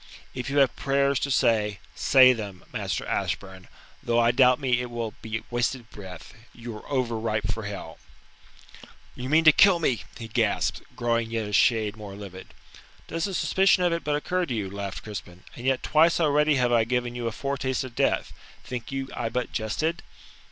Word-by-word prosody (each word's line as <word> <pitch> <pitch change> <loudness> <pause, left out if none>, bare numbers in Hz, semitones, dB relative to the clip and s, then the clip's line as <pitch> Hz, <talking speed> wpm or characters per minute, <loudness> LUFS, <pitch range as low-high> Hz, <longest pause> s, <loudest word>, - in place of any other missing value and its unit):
If 125 0 -4
you 140 - -1
have 135 -3 +4
prayers 140 0 +1
to 140 - -2
say, 110 -6 +2 0.2
say 130 -1 +6
them, 100 -5 -7
Master - - -2
Ashburn, 95 -1 -3 0.3
though 120 0 +1
I 120 0 +4
doubt 125 0 +4
me 125 -3 +1
it 125 - -5
will 115 -2 -4
be 110 0 -4
wasted 120 0 -2
breath 95 -4 -10 0.2
you 115 -1 -8
are 105 - -12
over 125 -5 -1
ripe 110 -1 -1
for 110 -2 -6
hell." 95 -6 -7 1.1
"You 125 +1 -6
mean 160 +2 +4
to 155 - +9
kill 190 +3 +6
me," 130 -10 0 0.2
he 115 - -7
gasped, 110 -2 0
growing 115 -1 0
yet 115 -2 -2
a 105 - -7
shade 110 -1 +3
more 105 -3 -9
livid. 95 -2 -10 0.5
"Does 165 0 -2
the 195 -2 -3
suspicion 190 0 +3
of 175 -1 +2
it 170 - -2
but 150 -1 0
occur 180 +4 -1
to 125 - -2
you?" 100 -3 -3
laughed 100 -1 -5
Crispin, 95 -4 -8
"and 125 +2 -5
yet 135 -1 +1
twice 165 +3 +4
already 150 -1 +3
have 125 -2 +2
I 115 -1 +4
given 120 +1 -1
you 120 -1 -3
a - - -1
foretaste 135 +1 -2
of 130 -2 -8
death. - - 0 0.3
Think 125 -1 -6
you 135 0 -3
I 115 - -2
but 125 +2 -3
jested?" 155 +11 -2
120 Hz, 195 wpm, -26 LUFS, 110-135 Hz, 1.1 s, to